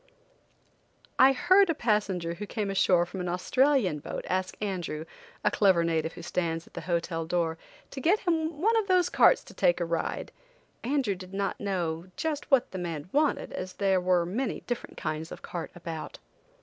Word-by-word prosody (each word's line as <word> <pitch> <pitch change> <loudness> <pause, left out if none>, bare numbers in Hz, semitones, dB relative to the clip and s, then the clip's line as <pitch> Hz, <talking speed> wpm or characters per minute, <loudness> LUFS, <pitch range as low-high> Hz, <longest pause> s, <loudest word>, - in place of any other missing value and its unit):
'" - - -39 0.3
I 265 - +8
heard 370 +8 +4
a 330 - +1
passenger 200 -8 0
who 205 +4 -7
came 205 -2 -2
ashore 180 -2 +3
from 185 +1 -6
an 180 - -2
Australian 205 - +2
boat - - -6
ask 185 0 -1
Andrew, 175 -6 -3 0.4
a - - +3
clever 190 -5 +4
native 165 -1 0
who - - -10
stands 165 -2 -2
at - - -21
the - - -5
hotel 170 -1 -1
door, 165 -1 -1 0.3
to 270 - -6
get 370 +10 +3
him 325 -4 0
one 445 +7 +3
of 435 -3 +1
those 365 -2 +3
carts - - +5
to - - -14
take - - +2
a - - 0
ride. - - -2 0.5
Andrew 255 -4 +1
did 185 +1 -10
not 195 0 -1
know 175 -5 -2
just 305 -2 -2
what 270 -3 +3
the 190 - -5
man 170 -2 -5
wanted 295 +1 +1
as 185 0 -5
there 190 -1 +2
were 180 -1 +2
many 230 +10 -2
different 245 -1 -5
kinds 155 +1 -4
of - - -9
carts 170 -2 -6
about. 165 -2 -6
190 Hz, 190 wpm, -28 LUFS, 170-270 Hz, 0.5 s, I